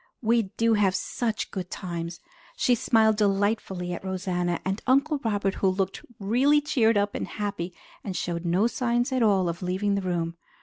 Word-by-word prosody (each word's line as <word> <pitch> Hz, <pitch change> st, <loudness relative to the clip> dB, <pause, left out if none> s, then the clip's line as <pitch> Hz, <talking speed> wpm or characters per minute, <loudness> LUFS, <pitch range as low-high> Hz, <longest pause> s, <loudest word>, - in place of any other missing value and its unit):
We 225 Hz, -2 st, +2 dB
do 230 Hz, 0 st, +3 dB
have 200 Hz, -3 st, +3 dB
such 225 Hz, +2 st, -2 dB
good 185 Hz, -3 st, -5 dB
times!" 170 Hz, -2 st, -5 dB, 0.4 s
She 250 Hz, -, +3 dB
smiled 220 Hz, -2 st, +3 dB
delightfully 195 Hz, -3 st, 0 dB
at 175 Hz, -, -6 dB
Rosanna 180 Hz, -2 st, -1 dB
and 190 Hz, +2 st, -1 dB
at -, -, -25 dB
Uncle 280 Hz, +3 st, +3 dB
Robert, 205 Hz, -3 st, 0 dB
who 195 Hz, -, +4 dB
looked 190 Hz, 0 st, -2 dB, 0.2 s
really 250 Hz, +9 st, +3 dB
cheered 240 Hz, -7 st, +2 dB
up 205 Hz, 0 st, +1 dB
and -, -, -3 dB
happy 200 Hz, -4 st, -4 dB, 0.3 s
and 190 Hz, -2 st, -4 dB
showed 170 Hz, -1 st, -2 dB
no 180 Hz, +5 st, +2 dB
signs 240 Hz, +1 st, 0 dB
at 260 Hz, -1 st, +1 dB
all 195 Hz, -5 st, +3 dB
of 170 Hz, 0 st, -3 dB
leaving 190 Hz, +3 st, 0 dB
the 200 Hz, -, 0 dB
room. 170 Hz, -2 st, -2 dB
200 Hz, 180 wpm, -26 LUFS, 180-225 Hz, 0.4 s, who